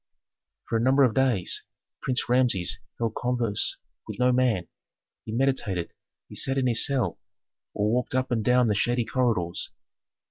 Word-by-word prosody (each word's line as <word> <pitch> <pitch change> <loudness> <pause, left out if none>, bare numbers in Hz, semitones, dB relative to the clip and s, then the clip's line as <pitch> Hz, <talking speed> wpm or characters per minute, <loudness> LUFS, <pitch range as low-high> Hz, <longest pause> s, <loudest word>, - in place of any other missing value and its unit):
For 115 - 0
a - - 0
number 135 +3 +4
of 125 -4 +3
days 125 -7 +1 0.4
Prince 130 -2 0
Rameses 110 -7 +1 0.2
held 115 -2 -1
converse 120 -4 -1 0.3
with - - -6
no 125 0 +3
man, 125 -8 +1 0.6
he - - -6
meditated; 115 -8 0 0.3
he - - -13
sat 135 0 0
in 130 - +1
his 115 -2 +3
cell, 135 -3 0 0.6
or 105 +1 +1
walked 125 +1 0
up 130 0 0
and 115 -3 +1
down 125 +2 +4
the 105 - +2
shady 120 +3 +1
corridors. 110 -10 0
120 Hz, 155 wpm, -26 LUFS, 110-130 Hz, 0.6 s, number